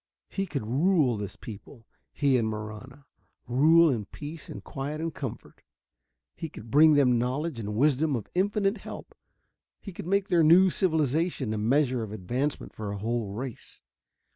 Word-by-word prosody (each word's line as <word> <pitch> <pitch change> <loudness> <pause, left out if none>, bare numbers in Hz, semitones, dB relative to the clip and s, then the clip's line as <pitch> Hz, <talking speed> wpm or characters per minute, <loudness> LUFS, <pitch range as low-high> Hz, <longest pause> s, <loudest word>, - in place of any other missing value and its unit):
He 195 -1 -3
could 140 -8 -4
rule 140 - +2
this 100 -2 -6
people, 110 +2 -11 0.3
he 140 -3 +2
and 115 -3 +2
Marahna, 110 +6 -8 0.4
rule 160 +7 +5
in 110 -5 -2
peace 150 +8 -9
and 100 - -8
quiet 145 +6 -5
and 165 0 -3
comfort. 130 -6 -7 0.7
He 165 - -6
could 110 -5 -11
bring 155 +1 +7
them 125 -4 +4
knowledge 130 +3 -2
and 105 -1 -4
wisdom 145 +3 +2
of 115 - -4
infinite 200 +3 +1
help; - - -9 0.7
he 195 - -9
could 170 - -8
make 200 +1 +1
their 175 -2 +4
new 175 +4 +6
civilization 160 - 0
a 110 - -2
measure 130 +2 +2
of 110 -2 -5
advancement 120 +8 -3
for 105 -2 -5
a 100 - -4
whole 115 +1 -2
race. 125 +2 -8
135 Hz, 165 wpm, -27 LUFS, 110-160 Hz, 0.7 s, bring